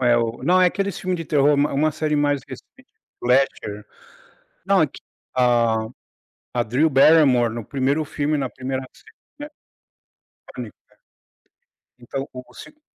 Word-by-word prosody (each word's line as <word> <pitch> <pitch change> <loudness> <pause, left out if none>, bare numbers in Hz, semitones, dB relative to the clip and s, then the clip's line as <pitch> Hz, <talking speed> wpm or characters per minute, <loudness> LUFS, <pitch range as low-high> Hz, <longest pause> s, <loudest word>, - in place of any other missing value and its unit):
É 120 -2 +4
o 115 +1 -2
não 180 +5 +3
é 185 - +6
aqueles 195 0 -2
filmes 185 -1 -2
de 165 - -5
terror, 145 -1 +3
uma 145 +1 +1
uma 150 +2 +1
série 155 0 -1
mais 145 -1 +1
recente - - -13 0.3
Fletcher. 120 -5 0 0.8
Não 195 -4 +4
é - - +3
que - - -14 0.3
a 120 -3 +2 0.7
a 120 - +3
Drew 125 +8 +1
Barrymore 135 -4 +5
no 115 - -5
1º 140 +5 -1
filme, 150 +1 -2
na 135 -2 -2
1ª 130 0 -4
série, - - -21 0.2
né 295 - -6 1.1
Pânico, - - -8
é. - - -26 1.1
Então 135 +3 -5
o 125 0 -8
o - - -20
segu 300 0 -13
140 Hz, 160 wpm, -22 LUFS, 125-155 Hz, 1.1 s, é